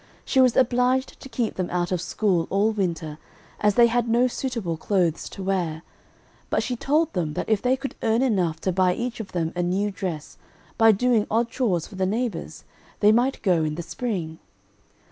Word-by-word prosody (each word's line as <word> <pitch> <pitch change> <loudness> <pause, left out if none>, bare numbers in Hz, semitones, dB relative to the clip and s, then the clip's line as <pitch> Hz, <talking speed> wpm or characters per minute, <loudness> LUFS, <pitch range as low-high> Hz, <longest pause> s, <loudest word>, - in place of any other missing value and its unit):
She 265 - +3
was 255 -2 +4
obliged 255 +1 +2
to 270 - -11
keep 230 -2 -2
them 185 -1 -2
out 175 0 -1
of 180 -2 0
school 180 -2 0
all 205 +3 +2
winter, 170 -7 -3 0.4
as 210 -1 +2
they 240 - +7
had 235 0 +1
no 240 +2 +4
suitable 235 -9 -3
clothes 170 -1 0
to 195 - -8
wear, 175 -4 -1 0.7
but - - +1
she 250 - -2
told 300 +6 +1
them 160 -5 -2
that - - -3
if 215 -2 +2
they 255 +1 +2
could 275 +1 -5
earn 225 +2 +2
enough 180 -10 +1
to 190 - 0
buy 180 0 +2
each 240 0 -4
of 220 - -7
them 165 -2 -1
a 175 - 0
new 190 +4 0
dress, 180 -6 -6 0.4
by 225 -1 +6
doing 225 0 +2
odd 230 +2 +1
chores 195 -12 0
for 190 - -12
the 190 0 +1
neighbors, 230 +3 -3 0.4
they 210 0 +6
might 245 +4 +1
go 175 -5 +3
in 155 -1 -2
the 170 - -5
spring. 175 -7 -4
205 Hz, 200 wpm, -24 LUFS, 175-240 Hz, 0.7 s, they